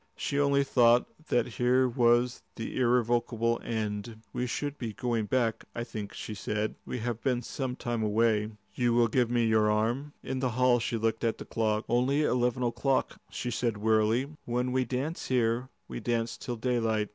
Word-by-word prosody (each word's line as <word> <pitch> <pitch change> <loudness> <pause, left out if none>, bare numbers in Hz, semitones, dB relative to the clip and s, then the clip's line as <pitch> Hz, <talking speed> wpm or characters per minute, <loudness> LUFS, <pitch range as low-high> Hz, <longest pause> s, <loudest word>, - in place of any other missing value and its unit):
She 140 - -2
only 140 -1 +3
thought 120 -2 +4 0.2
that 120 -2 +2
here 125 +2 +2
was 120 0 +2
the 115 - -5
irrevocable 120 -1 +1
end. 110 0 -4
"We 125 - -1
should 145 +4 -3
be 115 -3 -4
going 120 -4 -1
back, 115 -3 0
I 120 - -2
think," 110 -3 -7
she 110 - -6
said. 105 +1 -2
"We - - -3
have 120 -1 -3
been 125 -3 0
some 130 -3 -3
time 120 -2 -3
away. 110 0 +2
Will 110 -1 -13 0.2
you 120 -1 +3
give 120 0 +2
me 120 -1 +2
your 110 -1 +3
arm?" 120 +7 0
In 130 0 -3
the 130 -1 +1
hall 125 -1 +4
she 115 0 -1
looked 115 +1 -1
at 115 -1 +1
the - - -8
clock. 110 -1 0
"Only 130 +5 +2
eleven 125 -2 +1
o'clock," 130 +3 0
she 125 - -4
said 120 -2 -1
wearily. 110 +3 +2 0.2
"When 125 +1 -1
we 130 0 +1
dance 135 +7 -3
here, 125 0 +1 0.2
we - - -5
dance 115 0 -1
till 120 - -5
daylight. 115 -3 0
120 Hz, 180 wpm, -29 LUFS, 110-125 Hz, 0.2 s, thought